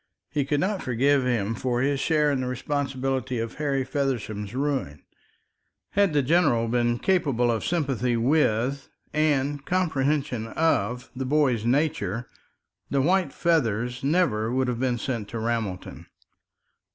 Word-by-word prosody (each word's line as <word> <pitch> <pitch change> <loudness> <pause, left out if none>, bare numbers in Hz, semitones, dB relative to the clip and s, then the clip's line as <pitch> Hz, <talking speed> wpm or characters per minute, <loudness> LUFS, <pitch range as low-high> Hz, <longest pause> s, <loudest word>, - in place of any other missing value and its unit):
He 145 -2 0
could 145 +1 0
not 195 +2 0
forgive 130 +2 +2
him 115 -4 0
for 120 +1 -1
his 140 +1 +1
share 150 -1 +2
in 135 -2 0
the 130 - -2
responsibility 130 -1 -2
of 115 0 -3
Harry 140 -3 +1
Feversham's 125 -6 -3
ruin. 135 - -2 0.9
Had 200 -4 +2
the 145 -2 +3
general 125 -6 +3
been 120 0 +1
capable 135 -9 +1
of 115 - -2
sympathy 135 -8 0
with 135 0 +1 0.2
and 145 -2 +1
comprehension 145 -8 0
of 125 -4 0
the 130 +1 -3
boy's 130 -5 +2
nature, 125 - 0 0.6
the 140 - +1
white 175 +1 +2
feathers 125 -7 0
would 140 - 0
never 120 -10 +1
have 125 -2 -2
been 125 -2 0
sent 115 -3 -3
to 115 - -5
Ramelton. 110 -5 -3
130 Hz, 140 wpm, -25 LUFS, 120-145 Hz, 0.9 s, the